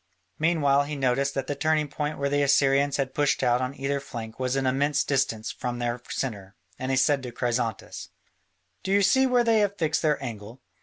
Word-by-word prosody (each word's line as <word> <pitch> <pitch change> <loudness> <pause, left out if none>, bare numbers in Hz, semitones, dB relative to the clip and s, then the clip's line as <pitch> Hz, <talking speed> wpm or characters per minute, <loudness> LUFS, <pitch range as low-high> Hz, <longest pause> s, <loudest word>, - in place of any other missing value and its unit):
Meanwhile 145 -4 +2
he 150 +1 -5
noticed 135 +1 0
that 135 -1 -2
the 145 - -2
turning 155 0 +1
point 150 +1 -4
where 140 - -1
the 145 +1 +1
Assyrians 140 0 +3
had 135 -2 -2
pushed 145 -2 +1
out 125 0 +2
on 130 +2 -3
either 140 +1 -1
flank 115 -4 -8
was 130 0 -1
an 135 -1 0
immense 140 +3 +1
distance 125 -6 -1
from 120 -1 -4
their 120 0 -2
centre, 100 -6 -4 0.2
and 130 - -3
he 130 - +1
said 135 +1 +3
to 125 -2 -7
Chrysantas: 120 -3 -3 0.7
"Do 190 - -4
you 200 0 +4
see 265 +6 +4
where 250 -1 +3
they 225 -2 +3
have 205 -1 0
fixed 160 -3 0
their 150 -2 +1
angle?" 115 -2 -8
140 Hz, 205 wpm, -26 LUFS, 125-150 Hz, 0.7 s, you